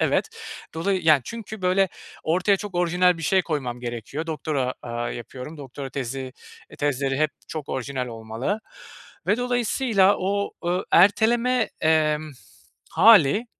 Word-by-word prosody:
evet. - - +1 0.5
Dolayı 185 +2 0
yani, 155 -4 +5
çünkü, 220 -3 -8
böyle, 185 +1 +3 0.3
ortaya 185 +5 +2
çok 200 -1 -8
orijinal 180 0 +2
bir 165 - -7
şey 190 +5 +3
koymam 130 -8 -3
gerekiyor. 120 +6 -5
Doktora, 150 -5 -2
aaa, 120 0 -3
yapıyorum, 125 +6 -8
doktora 135 0 -7
tezi, 130 0 -5 0.5
tezleri 135 -2 0
hep 155 -1 +2 0.2
çok 155 -3 -6
orijinal 130 0 -3
olmalı 115 - -4 0.7
ve 205 - +3
dolayısıyla 245 -4 +2
o, 200 +2 -1
ııı, 180 +1 0
erteleme, 230 +6 +4
emm, 155 -1 +2 0.6
hâli, 215 - +6
160 Hz, 130 wpm, -24 LUFS, 135-195 Hz, 0.7 s, hâli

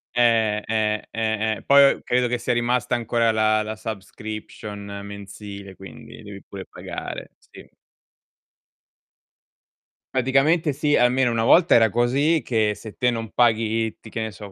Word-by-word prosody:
Eh, 110 -3 +2
eh, 105 -1 -1
eh, 110 -1 -1
eh. - - -14
Poi 140 0 +7
o - - -13
credo 125 0 +1
che 120 0 -1
sia 120 - -1
rimasta 120 0 0
ancora 115 -1 +1
la 110 0 +2
la 110 +1 -5
subscription 105 -1 -7
mensile, 100 -1 -9
quindi 95 - -12
devi 100 -1 -10
pure 95 -1 -8
pagare. - - -8
Sì. - - -16 2.5
Praticamente 135 +5 +2
sì, 145 +1 +1
almeno 125 +1 +3
una 115 -1 0
volta 170 +8 +5
era 110 -3 +5
così, 140 +7 +2
che 110 -3 +1
se 105 +1 -11
te 125 -1 +2
non 115 -1 -4
paghi 115 -1 +2
i 110 - -7
ti 110 - -13
che 115 - -4
ne 110 0 -3
so 100 0 -11
110 Hz, 155 wpm, -23 LUFS, 105-125 Hz, 2.5 s, Poi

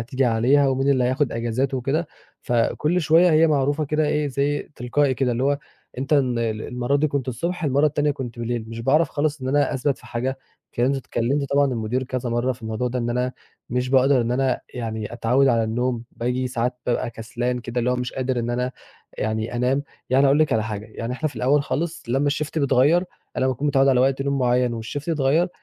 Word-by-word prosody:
هتيجي 130 +3 -1
عليها، 125 +5 +3
ومين 135 +1 +1
اللي 130 -2 +3
هياخد 130 +1 +1
أجازات 120 +4 -1
وكده. 135 +6 -1 0.4
فكلّ 150 +8 +1
شوية 165 +3 +5
هي 160 +1 +5
معروفة 145 0 +1
كده 150 +1 0
إيه، 150 -1 0
زَي 140 +2 -1
تلقائي 130 +3 +1
كده، 125 -1 0
اللي 120 +2 -1
هو 140 0 +2 0.4
أنت 135 +3 -3
ال 130 -5 +3
المرّة 120 +4 -1
دي 155 +2 +2
كنت 140 -2 -2
الصبح، 170 +8 -3
المرّة 140 +1 +3
التانية 150 0 +1
كنت 130 -5 -6
بليل، 120 -1 -2
مش 115 0 -6
باعرف 145 +7 +3
خالص 150 -1 -1
إن 130 - -2
أنا 145 +1 +2
أثبَت 135 +1 0
في 125 - -16
حاجة. 125 +3 -3 0.4
كنت 130 +3 +1
اتكلمت 135 +2 -1
طبعًا 145 0 +4
المدير 120 +2 -1
كذا 130 -2 -3
مرّة 120 +2 +1
في 120 - -14
الموضوع 110 +3 -2
ده، 125 +1 -3
إن 120 -1 -1
أنا 125 +1 -1 0.4
مش 125 +1 -1
باقدر 135 0 +4
إن 120 +1 -1
أنا 130 0 +1
يعني 110 -2 -4
أتعوّد 125 +4 +2
على 115 -3 +3
النوم، 120 +1 -1
باجي 125 +2 -2
ساعات 125 0 -2
بابقى 120 -1 0
كسلان 120 +2 -3
كده، 120 +1 -4
اللي 120 +1 +1
هو 125 - +1
مش 125 0 -3
قادر 130 -1 -1
إن 120 0 -2
أنا 125 +1 -1 0.5
يعني 110 +2 -2
أنام. 130 +3 +1 0.3
يعني 135 +2 +5
أقول 140 +2 +4
لِك 155 -1 +3
على 110 -1 +2
حاجة، 105 -1 -5
يعني 115 +2 -5
إحنا 155 +5 -1
في 145 - -13
الأول 140 +3 +2
خالص 170 +5 -3
لمّا 140 +4 +1
الshift 150 +2 -2
بيتغير، 145 +5 +3 0.3
أنا 130 - +1
باكون 130 +3 -1
متعوّد 135 0 +3
على 130 -2 +4
وقت 135 +1 +2
نوم 140 0 0
مُعيّن 125 -2 +1
والshift 145 +7 -6
يتغيّر، 155 +3 +2
130 Hz, 210 wpm, -23 LUFS, 120-140 Hz, 0.5 s, شوية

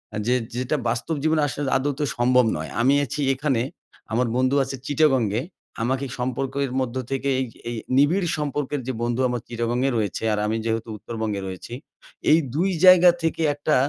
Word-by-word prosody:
আ - - -2
যে 125 - +3 0.2
যেটা 130 +4 0
বাস্তব 125 +7 -2
জীবনে 155 -1 +2
আসলে 140 +1 -5 0.2
আদৌত 140 +2 -2 0.2
সম্ভব 125 +1 +4
নয়। 80 - -5
আমি 130 +4 +4
আছি 145 +4 -4
এখানে 135 -3 0 0.5
আমার 120 +2 +1
বন্ধু 130 +2 +2
আছে 135 +1 -5
চিটাগং 145 -4 +3 0.2
এ। - - -2 0.4
আমাকে 130 +3 0
সম্পর্কের 135 +2 -2
মধ্য 130 -1 -3 0.2
থেকে 135 +1 -1
এই 130 - 0 0.2
এই 120 - -3 0.2
নিবিড় 170 +7 +3
সম্পর্কের 145 -1 -2
যে 130 - -1
বন্ধু 120 +2 0
আমার 125 -2 -2
চিটাগং 120 +1 -2
এ - - +2
রয়েছে, 105 -2 -2
আর 105 - -1
আমি 110 +1 0
যেহেতু 115 0 -2
উত্তরবঙ্গে 110 -2 -4
রয়েছি। 95 +5 -8 0.6
এই 155 - +7 0.2
২ 180 +5 +2 0.2
জায়গা 180 -1 +9
থেকে 165 0 0
একটা 145 +1 0
130 Hz, 175 wpm, -23 LUFS, 120-145 Hz, 0.6 s, জায়গা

